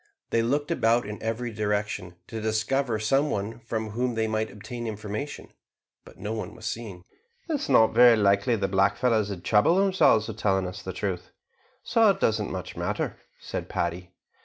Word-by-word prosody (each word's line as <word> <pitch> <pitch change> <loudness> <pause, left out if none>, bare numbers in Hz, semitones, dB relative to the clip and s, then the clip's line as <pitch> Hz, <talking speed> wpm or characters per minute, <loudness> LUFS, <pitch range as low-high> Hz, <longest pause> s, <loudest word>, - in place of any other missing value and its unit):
They 115 - +3
looked 145 +7 0
about 120 -7 +2
in 105 0 -7
every 115 +2 -2
direction, 105 -4 -2
to 110 +2 -6
discover 110 +3 0
some 135 +7 +2
one 110 +2 -3
from 110 -2 -4
whom 120 +2 -1
they 110 0 +1
might 110 0 -1
obtain 115 +3 -7
information, 110 +6 -6 0.5
but - - -15
no 105 +4 -4
one 110 - -5
was 110 -1 -11
seen. 110 -6 -5 0.4
"It 330 - -2
is 290 - -2
not 110 -5 +5
very 120 0 +7
likely 100 +3 +3
the 100 -3 -1
black 95 +1 +2
fellows 110 -5 +2
would 90 -4 -6
trouble 105 +11 +4
themselves 190 - +4
with 110 -2 -6
telling 95 -3 +1
us 90 +1 -6
the 95 - -5
truth, 90 -1 -4 0.5
so 225 -2 +4
it 195 - +1
doesn't 110 -2 +1
much 90 -1 -6
matter," 90 +5 -2 0.2
said - - -5
Paddy. 85 +1 -2
110 Hz, 185 wpm, -26 LUFS, 100-120 Hz, 0.5 s, very